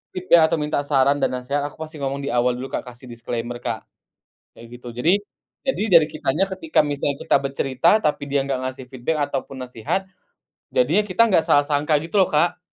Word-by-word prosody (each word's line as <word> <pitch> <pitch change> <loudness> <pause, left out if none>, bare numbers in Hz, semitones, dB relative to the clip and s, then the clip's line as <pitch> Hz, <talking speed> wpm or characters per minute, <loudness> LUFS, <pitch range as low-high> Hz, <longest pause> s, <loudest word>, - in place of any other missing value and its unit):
feedback 180 -2 +4
atau - - 0
minta 150 -1 -1
saran 140 0 +3
dan - - +2
nasehat, 140 +3 -2
aku - - -12
pasti 155 -1 -10
ngomong 140 0 -3
di 140 - -2
awal 125 0 +2
dulu, 130 +2 -7
Kak, - - -4
kasih 125 +1 -12
disclaimer, 120 +1 -5
Kak, 115 -2 -4 0.7
kayak 115 - -13
gitu. 125 - -10
Jadi, 165 +11 +3 0.5
jadi 265 -6 0 0.2
dari 155 - 0
kitanya 155 +2 -1
ketika 185 -4 -3
misalnya 145 -1 -1
kita - - +2
bercerita, 135 +1 0
tapi 150 -7 -1
dia 140 - +2
nggak 135 -2 -1
ngasih 130 0 -5
feedback 130 +5 -3
ataupun 135 -1 -5
nasihat, 125 - -3 0.7
jadinya 165 +12 +3
kita 200 +2 +1
nggak 175 -5 +3
salah 145 - +5
sangka, 145 +1 0
gitu 165 +5 -3
loh, 190 - +6
Kak. 170 +4 +2
140 Hz, 195 wpm, -22 LUFS, 125-160 Hz, 0.7 s, loh